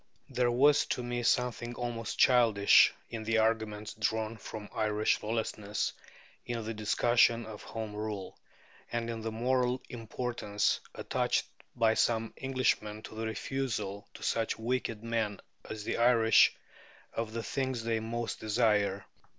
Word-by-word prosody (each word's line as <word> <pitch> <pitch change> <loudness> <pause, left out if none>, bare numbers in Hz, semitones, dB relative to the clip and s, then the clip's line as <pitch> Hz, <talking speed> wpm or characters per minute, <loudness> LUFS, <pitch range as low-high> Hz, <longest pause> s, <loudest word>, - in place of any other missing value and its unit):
There 125 -1 +1
was 145 +4 +4
to 125 - -2
me 120 0 -2
something 120 0 0
almost 120 -2 -4
childish 115 -5 +6 0.2
in 115 -1 -4
the 115 +1 +1
arguments 110 -1 0
drawn 110 +1 -1
from 105 -1 -8
Irish 110 -1 +1
lawlessness 105 -2 -2 0.5
in 115 -2 -4
the 115 - -3
discussion 115 +2 +3
of 110 -1 -9
Home 110 -2 -6
Rule, 105 -2 -5 0.6
and 115 0 -2
in 115 -1 -5
the 115 0 -3
moral 125 +2 +1
importance 115 -3 -1 0.2
attached - - 0 0.3
by 115 -2 +3
some 115 0 +1
Englishmen 120 -5 -1
to - - -9
the 110 +1 -3
refusal 110 -3 -3
to - - -10
such 115 -1 0
wicked 115 -1 -2
men 115 -3 -1 0.3
as 110 -1 -5
the - - -2
Irish 115 -1 +5 0.6
of 115 -1 -3
the 115 0 -3
things 130 -3 -2
they 115 -1 0
most 115 +1 -4
desire. 105 -3 +1
115 Hz, 140 wpm, -31 LUFS, 110-120 Hz, 0.6 s, childish